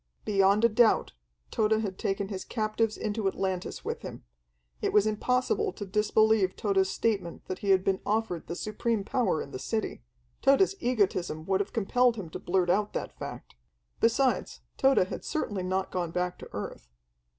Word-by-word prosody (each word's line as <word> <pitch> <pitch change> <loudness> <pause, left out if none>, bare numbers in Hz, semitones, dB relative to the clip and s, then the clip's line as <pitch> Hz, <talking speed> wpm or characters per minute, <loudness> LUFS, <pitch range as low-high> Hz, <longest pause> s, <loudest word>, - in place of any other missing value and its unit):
Beyond 200 +2 +4
a - - +6
doubt 225 - +3 0.4
Tode 215 0 +2
had 195 -4 -4
taken 195 0 -1
his 190 -3 -4
captives 215 0 -1
into 210 -1 -1
Atlantis 190 -1 -3
with - - -3
him. - - -8 0.6
It - - 0
was 210 -1 +5
impossible 250 - +1
to 205 - -6
disbelieve 210 0 +3
Tode's 195 -2 +1
statement 200 -7 -2
that 185 - -5
he 200 - -3
had 190 -1 +5
been 190 -1 +1
offered 210 -5 -1
the 170 - -4
supreme 215 +2 -1
power 230 -6 0
in 140 - -12
the 130 - -6
city. 215 - -3 0.4
Tode's 275 +9 +4
egotism 185 -10 0
would 190 +1 +1
have 200 - -2
compelled 240 +3 +2
him 185 -7 -7
to - - -6
blurt 175 -1 +1
out 205 +3 +1
that - - -4
fact. - - -7 0.5
Besides, 250 +3 +1
Tode 270 -8 +4
had - - -6
certainly 205 -11 -2
not 185 +1 -1
gone 175 -2 -2
back 180 +1 -2
to - - -10
earth. - - -6
205 Hz, 175 wpm, -28 LUFS, 185-225 Hz, 0.6 s, a